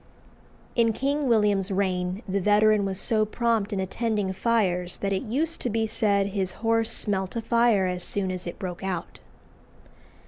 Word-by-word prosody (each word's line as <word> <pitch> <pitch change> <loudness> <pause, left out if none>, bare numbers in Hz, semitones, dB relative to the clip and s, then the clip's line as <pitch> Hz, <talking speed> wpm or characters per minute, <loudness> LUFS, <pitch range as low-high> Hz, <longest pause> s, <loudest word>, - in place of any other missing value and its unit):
In 230 -2 +3
King 280 +4 -1
William's 210 -4 +2
reign 185 +1 -1
the 195 +1 -1
veteran 210 +1 +4
was 190 -1 -3
so 215 0 +3
prompt 225 -1 0
in 200 - -2
attending 205 0 -1
fires 185 -5 0
that 195 0 -2
it 190 - -1
used 310 +9 -2
to 245 - -1
be 225 0 0
said 200 -2 +1
his 190 -2 -2
horse 225 0 +2
smelt 190 -2 0
a 230 - -1
fire 230 -5 +3
as 180 -1 -2
soon 190 -1 -1
as 185 -1 -5
it 170 - -6
broke 180 -3 -6
out. 190 -3 -4
205 Hz, 170 wpm, -26 LUFS, 190-225 Hz, -, veteran